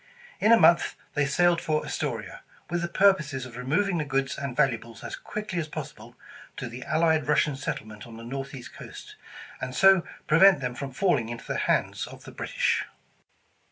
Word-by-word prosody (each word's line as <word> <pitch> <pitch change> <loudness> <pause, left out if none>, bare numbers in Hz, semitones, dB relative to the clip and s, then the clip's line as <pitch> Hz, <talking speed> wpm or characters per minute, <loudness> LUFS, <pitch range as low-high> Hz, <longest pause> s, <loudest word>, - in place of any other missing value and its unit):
In 215 - +4
a 230 - +9
month 170 +1 +5 0.2
they 145 -2 +1
sailed 175 +4 +3
for 155 -1 -1
Astoria, - - -4 0.3
with 175 -1 0
the 170 - -1
purpose 185 -5 +3
of 120 -2 -11
removing 165 +9 0
the - - 0
goods 135 -2 -1
and 140 -3 -5
valuables 115 -5 0
as - - -5
quickly 210 -4 -5
as 160 - -3
possible, 145 -6 -8 0.4
to 125 - -4
the 120 +2 -8
allied 160 -1 +2
Russian 150 -1 +2
settlement 110 -5 -6
on 115 -1 -11
the 115 - -10
Northeast 135 +1 -7
coast, - - -11 0.5
and 130 0 -4
so 195 -2 +6 0.2
prevent 180 +1 +6
them 125 -2 -3
from 135 +2 -6
falling 130 - +1
into 120 0 -7
the - - -3
hands - - 0
of - - -12
tlie - - -12
British. - - 0
150 Hz, 180 wpm, -27 LUFS, 125-170 Hz, 0.5 s, a